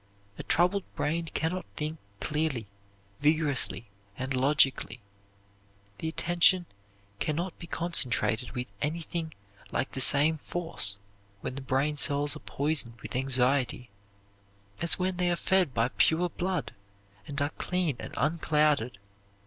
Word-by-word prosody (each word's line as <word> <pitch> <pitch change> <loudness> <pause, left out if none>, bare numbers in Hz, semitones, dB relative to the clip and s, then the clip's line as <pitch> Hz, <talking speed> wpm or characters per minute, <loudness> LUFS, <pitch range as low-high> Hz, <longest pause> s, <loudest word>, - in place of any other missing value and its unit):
A - - -2
troubled 180 +3 +2
brain 165 +2 -1
can 160 +1 -1
not 185 -1 -5
think 155 +1 -3 0.2
clearly, 150 -7 -1 0.5
vigorously, 145 -6 +1 0.3
and 130 +1 -3
logically. 135 -2 +2 1.0
The 160 - -3
attention 175 +2 +3 0.5
can 155 - -1
not 175 +3 -4
be 170 - -9
concentrated 130 -8 +2
with 125 -1 -3 0.2
anything 160 +1 -3 0.4
like - - -2
the 130 - -1
same 150 +4 +6
force 100 - -1 0.4
when - - -4
the 140 - -6
brain 135 +3 0
cells 145 +1 +2
are - - -8
poisoned 140 -7 -1
with 110 0 -6
anxiety 130 -2 +1 0.9
as 170 -2 +4
when 185 0 -1
they 180 -1 +1
are 175 - +2
fed 185 -3 +2
by 115 0 +1
pure 170 +6 +2
blood 175 -8 -3 0.5
and 140 0 -4
are 145 +1 0
clean 180 -6 0
and - - -8
unclouded. 150 -6 +1
150 Hz, 135 wpm, -29 LUFS, 130-170 Hz, 1.0 s, same